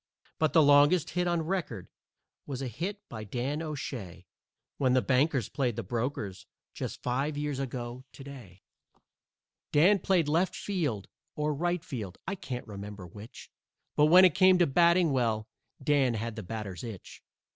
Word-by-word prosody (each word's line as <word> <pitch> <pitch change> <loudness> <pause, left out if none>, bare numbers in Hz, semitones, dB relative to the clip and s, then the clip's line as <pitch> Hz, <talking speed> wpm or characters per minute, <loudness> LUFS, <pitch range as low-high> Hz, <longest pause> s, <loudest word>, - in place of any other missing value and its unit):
But 155 -1 +2
the 160 - +6
longest 145 +4 +5
hit 180 0 0
on 170 -2 +1
record 155 - -3 0.6
was 135 -2 -4
a - - -2
hit 190 - -5
by 110 -2 -7
Dan 125 +8 -3
O'Shay 130 - -6 0.5
When 130 -2 +3
the 130 - +4
Bankers 135 -2 +2
played 125 -5 -1
the 115 - -4
Brokers 115 -2 -4 0.3
just - - -6
five 140 +4 -1
years 145 -2 -2
ago 125 -1 -5
to 135 - -11
day. 120 -10 -12 1.1
Dan 185 +7 +5
played 180 -4 +2
left 165 +5 +1
field 150 - -2 0.3
or 150 0 0
right 175 +3 -1
field, 105 - -6
I 190 - -1
can't 140 -11 -6
remember 100 -2 -8
which, 105 +6 -12 0.4
But 150 - +5
when 180 +4 +8
it 180 - +4
came 185 +1 +6
to 175 - +4
batting 170 +3 +4
well, 115 -4 0 0.4
Dan 135 -4 +2
had 115 +1 -4
the 110 - -5
batter's 100 -3 -6
itch. 110 -6 -9
135 Hz, 160 wpm, -29 LUFS, 115-165 Hz, 1.1 s, when